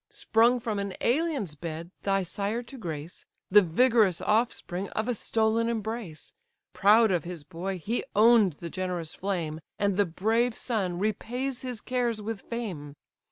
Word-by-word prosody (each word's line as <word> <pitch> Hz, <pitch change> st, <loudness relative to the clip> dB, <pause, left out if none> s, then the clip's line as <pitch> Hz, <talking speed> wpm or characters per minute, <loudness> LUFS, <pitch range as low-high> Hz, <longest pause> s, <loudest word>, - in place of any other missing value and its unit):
Sprung 235 Hz, +3 st, +3 dB
from 225 Hz, -4 st, -2 dB
an 200 Hz, -1 st, -3 dB
alien's 275 Hz, -, 0 dB
bed 165 Hz, +2 st, -6 dB
thy 195 Hz, -1 st, +1 dB
sire 205 Hz, +6 st, -2 dB
to 255 Hz, +3 st, -11 dB
grace, 165 Hz, -, -6 dB, 0.3 s
The 210 Hz, +2 st, +9 dB
vigorous 210 Hz, +1 st, +3 dB
offspring 205 Hz, -4 st, 0 dB
of 215 Hz, +2 st, -1 dB
a 245 Hz, -, +1 dB
stolen 225 Hz, +1 st, +1 dB
embrace: 220 Hz, -7 st, -4 dB, 0.4 s
Proud 215 Hz, +2 st, +5 dB
of 175 Hz, -4 st, +1 dB
his 175 Hz, -3 st, -7 dB
boy, 185 Hz, +4 st, -4 dB
he 220 Hz, +8 st, -2 dB
own'd 215 Hz, -3 st, +6 dB
the 170 Hz, +3 st, -8 dB
generous 180 Hz, -4 st, -3 dB
flame, 170 Hz, -5 st, -3 dB, 0.2 s
And 200 Hz, -2 st, +1 dB
the 205 Hz, -2 st, +3 dB
brave 225 Hz, +7 st, +1 dB
son 195 Hz, -8 st, -1 dB
repays 245 Hz, +6 st, -2 dB
his 250 Hz, -4 st, -5 dB
cares 245 Hz, -3 st, -1 dB
with 215 Hz, 0 st, -5 dB
fame. 180 Hz, -12 st, -5 dB
205 Hz, 155 wpm, -28 LUFS, 180-230 Hz, 0.4 s, The